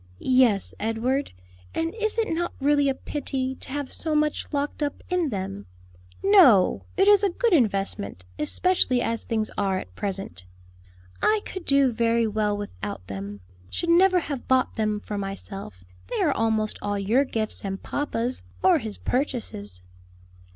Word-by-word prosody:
"Yes, 250 - +3
Edward, 235 +6 -1 0.4
and 330 +1 -1
is 435 -1 -1
it 450 -1 +1
not 345 +1 -2
really 285 0 +3
a 270 - 0
pity 265 -2 -3
to - - -9
have 285 0 -4
so 315 -2 -1
much 300 0 0
locked 290 +1 -2
up 290 -1 -2
in 355 -4 +1
them?" 185 - -5 0.6
"No, 345 - +6
it 390 - +4
is 410 -1 +6
a 400 - +4
good 465 +3 +1
investment; 195 - 0
especially 260 - +2
as 230 -1 -2
things 220 -2 -1
are 195 -2 +1
at 90 - -7
present." 185 - -5 0.7
"I 430 0 +3
could 375 -2 -7
do 275 -2 +5
very 230 0 +2
well 210 -1 0
without 100 - -6
them; 100 +1 -7 0.3
should 340 - -2
never 365 +1 +5
have 280 -5 -5
bought 260 0 +2
them 215 -2 0
for 205 0 -5
myself: 195 - -7 0.2
they - - -3
are - - +3
almost 220 -1 0
all 205 0 -1
your 220 +8 +2
gifts 220 -5 -3
and 195 -1 -4
papa's, 255 -3 -2 0.2
or 365 -4 +5
his 220 -5 -5
purchases." 215 - -3
235 Hz, 160 wpm, -25 LUFS, 200-295 Hz, 0.7 s, No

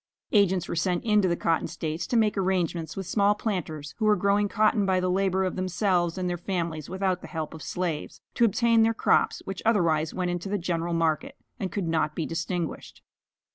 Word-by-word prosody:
Agents 190 -4 +3
were - - -3
sent 175 +2 0
into 210 -4 +3
the 170 - +1
cotton 165 -1 0
States, 160 +1 -4
to 240 - +1
make 215 -2 +3
arrangements 180 -4 -1
with 195 - -3
small 205 +3 +2
planters, 160 -9 -4
who 220 - +1
were 210 0 +5
growing 200 +2 +2
cotton 215 +1 +2
by 190 -1 +2
the 180 0 0
labor 190 0 +1
of 185 - -2
themselves 185 -1 0
and 185 -1 -1
their 175 -1 -2
families 170 -4 -3
without 190 0 -1
the - - -9
help 160 -2 -5
of 160 - -9
slaves, 165 0 -3
to - - +1
obtain 230 +1 +4
their 225 0 +3
crops, - - +2
which 195 -1 -5
otherwise 165 -8 +2
went 180 -1 -2
into 175 +2 -4
the 205 - 0
general 170 -1 -2
market, 165 - 0 0.2
and 190 -5 -3
could 195 -3 -2
not 160 -2 0
be 160 - -2
distinguished. 170 0 -4
185 Hz, 205 wpm, -27 LUFS, 165-200 Hz, 0.2 s, were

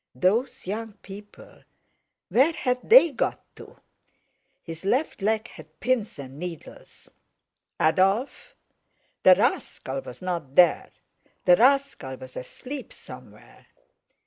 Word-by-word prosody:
Those 240 - 0
young 215 +3 -5
people—where 210 +7 -4
had 250 -4 -1
they 440 -9 +8
got 270 - -2
to? - - -13 0.9
His 165 0 -9
left 250 +5 -1
leg 220 +2 0
had 155 -1 -15
pins 240 -6 -1
and 135 0 -10
needles. 175 -2 -10 0.7
"Adolf!" 195 - +1 0.7
The 185 - +7
rascal 180 - -2
was 125 - -11
not 170 -7 -4
there; 175 -2 +4 0.6
the 180 - +7
rascal 265 - +2
was 130 0 -12
asleep 260 - -8
somewhere. - - -13
200 Hz, 105 wpm, -25 LUFS, 160-250 Hz, 0.9 s, they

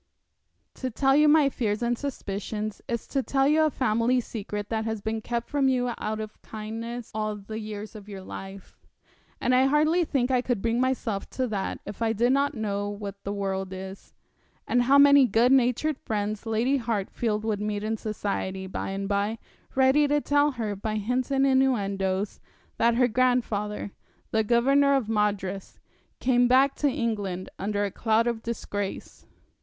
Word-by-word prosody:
'To 260 - -4
tell 270 +3 +2
you 300 +1 +5
my 300 -1 +6
fears 225 -5 -1
and 240 0 +1
suspicions 215 -5 -4
is 235 -1 -3
to 275 - -1
tell 270 +1 +1
you 305 +2 +4
a 310 - +4
family 240 -1 +1
secret 210 -3 -5
that 220 -1 -1
has 220 -1 -3
been 220 +2 -3
kept 235 +1 -3
from 285 -2 +1
you 250 -2 +1
out 215 0 -3
of 215 0 -7
kindness 225 +2 -6
all 215 0 -2
the 210 +2 -7
years 210 -1 -7
of 210 -2 -11
your 195 -2 -8
life 195 0 -10 0.6
and 255 - +1
I 255 +1 +5
hardly 310 +5 +3
think 265 -5 0
I 250 -1 +3
could 245 -4 -1
bring 230 +4 0
myself 250 -6 -1
to 260 - +1
that 200 -3 -3
if 205 +2 -8
I 225 -1 +2
did 240 +4 +2
not 280 0 +1
know 205 -2 -2
what 200 -1 -7
the 200 - -3
world 190 -1 -3
is, 190 +1 -9 0.5
and 245 - +3
how 270 +3 +5
many 280 -2 +7
good 235 +4 +3
natured 265 +3 +2
friends 210 +1 -3
Lady 235 +5 +1
Hartfield 220 -2 -2
will 215 -2 0
meet 210 -1 -2
in 220 +1 -1
society, 200 -3 -3
by 190 - -4
and 195 0 -3
by, 205 +2 0 0.4
ready 265 +3 +4
to 295 +1 +2
tell 290 0 +3
her, 220 -4 -3
by 215 +2 -3
hints 245 +5 -1
and 275 0 +2
innuendoes, 200 -7 +1 0.4
that 230 0 +3
her 250 +1 +4
grandfather, 220 -4 0 0.4
the 220 0 +2
Governor 275 +5 +4
of 260 -6 0
Madras, 205 -3 -1 0.4
came 245 -1 +3
back 265 +2 +4
to 290 - +2
England 210 -8 -2
under 205 +1 -1
a 200 - -3
cloud 225 +2 +1
of 235 -2 -1
disgrace.' 205 -4 -5
225 Hz, 175 wpm, -26 LUFS, 205-255 Hz, 0.6 s, many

